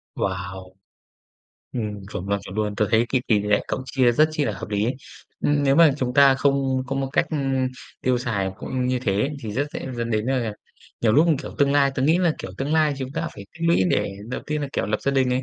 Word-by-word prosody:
Wow! 95 0 -4 1.0
Ừm, 105 -5 -4
chuẩn 95 +3 -5
luôn, 100 0 +1
chuẩn 95 - -9
luôn. 105 -1 -1
Tớ 105 - +2
thấy 115 +1 +3
cái 130 -2 +1
tỉ 105 -3 +4
lệ 105 0 +2
cậu 130 - -2
chia 130 -3 +3
rất 155 +6 +4
chi 150 -2 0
là 110 - -1
hợp 95 +1 -7
lý 105 0 0
ấy. 125 - 0 0.5
Ừm, 145 -1 +3
nếu 135 0 +4
mà 165 -3 +7
chúng 125 -1 -1
ta 140 -1 +7
không 135 -1 +1
có 135 +1 -3
một 135 0 -1
cách, - - +2
ưm, 135 -4 0 0.3
tiêu 125 -1 +1
xài 100 -6 -1
cũng 130 -1 -3
như 125 0 +1
thế 105 +2 0
thì 110 - -5
rất 145 +6 0
dễ - - -5
dẫn 115 0 -2
đến, 110 +1 0
à, 135 - +2
là, 115 -3 -2 0.5
nhiều 110 -2 +3
lúc, 155 +7 +5 0.2
kiểu, - - -8
tương 140 -1 +3
lai 140 -1 +4
tớ 130 - -1
nghĩ 160 +5 +4
là, 175 -3 +3
kiểu, - - -6
tương 140 +3 -1
lai 155 -2 +3
chúng 130 0 -5
ta 165 - -2
phải 100 - -9
tích 165 +1 -3
lũy 170 - +4
để - - +1 0.2
đầu 125 - -4
tiên 150 0 -1
là, 140 - -3
kiểu, - - -1
lập 105 - -1
gia 140 - +1
đình 130 -2 +2
này, 125 +1 0
130 Hz, 255 wpm, -23 LUFS, 105-140 Hz, 1.0 s, mà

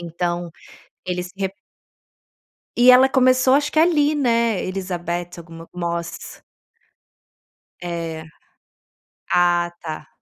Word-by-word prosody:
Então, 175 0 -3 0.6
eles 180 0 -3
re 195 -1 -3 1.2
E 245 +1 +7
ela 260 +1 +6
começou 255 0 +3
acho 295 +1 0
que 310 - +2
ali, 310 -3 +3
né? 235 -7 +1
Elisabeth 175 -2 -4
alguma 165 0 -11
Moss. 170 -1 -5 1.4
É. 165 -2 -5 1.1
Ah, 175 -1 +2
tá. 155 -2 -7
180 Hz, 95 wpm, -21 LUFS, 170-250 Hz, 1.4 s, E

